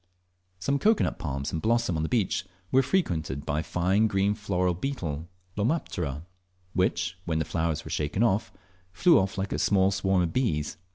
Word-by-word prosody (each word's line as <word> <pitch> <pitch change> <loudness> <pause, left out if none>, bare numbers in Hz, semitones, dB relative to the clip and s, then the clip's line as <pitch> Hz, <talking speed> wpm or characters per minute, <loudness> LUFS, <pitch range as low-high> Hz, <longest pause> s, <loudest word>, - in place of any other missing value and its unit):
Some 140 +10 0
cocoa 220 +5 +4
nut - - -2
palms 70 -2 -3
in 80 - -1
blossom 115 -2 +1
on 80 - 0
the 80 - -2
beach 105 -8 +1 0.3
were 135 - +5
frequented 85 - -1
by 75 - 0
a - - 0
fine 95 +6 +2
green 100 0 +2
floral 90 -4 0
beetle 85 - -4 0.3
(Lomaptera) 95 - -1 0.5
which, 90 -1 0
when 80 -2 0
the 80 - 0
flowers 80 -1 -1
were - - -7
shaken, 75 +9 0 0.7
flew 170 - +5
off 95 +1 -1
like 95 +1 -2
a - - -1
small 95 -1 +3
swarm 95 -1 +2
of 85 - -2
bees. 75 - 0
95 Hz, 175 wpm, -27 LUFS, 80-110 Hz, 0.7 s, were